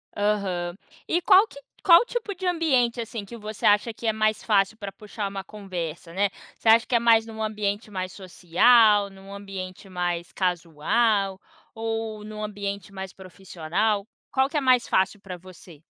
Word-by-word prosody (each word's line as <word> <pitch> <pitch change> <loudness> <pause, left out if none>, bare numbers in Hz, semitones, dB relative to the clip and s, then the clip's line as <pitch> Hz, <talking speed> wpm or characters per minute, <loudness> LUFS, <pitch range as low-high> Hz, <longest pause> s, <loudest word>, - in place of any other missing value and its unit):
Aham. 195 -4 -1 0.3
E 345 - +1
qual 390 +3 +6
que 280 - -13 0.2
qual 340 -2 +9
o 480 - -1
tipo 465 -4 -4
de 370 0 -7
ambiente, 260 -9 +1
assim, 225 -2 -6
que 235 - -10
você 215 -1 -6
acha 210 +2 +4
que 230 - -6
é 220 - +2
mais 215 0 +1
fácil 205 0 +2
pra 200 -2 -6
puxar 210 -1 -6
uma 195 -1 -6
conversa, 175 -5 -6
né. 200 +1 +1 0.3
Você 225 - 0
acha 230 +1 +6
que 245 - 0
é - - +5
mais 225 -1 +4
num 220 -1 -6
ambiente 210 0 -2
mais 185 -1 -4
social, 205 +3 +4
num 195 +1 -13
ambiente 195 -1 -8
mais 175 -2 -3
casual, 190 +4 0 0.4
ou 225 -1 -4
num 215 0 -8
ambiente 200 -1 -5
mais 190 -1 -6
profissional? 190 +2 -2 0.2
Qual 265 0 +2
que 310 - -10
é 295 - +2
mais 255 -2 +3
fácil 190 +2 +1
pra 185 -2 -8
você? 175 -3 -15
205 Hz, 175 wpm, -25 LUFS, 190-225 Hz, 0.4 s, qual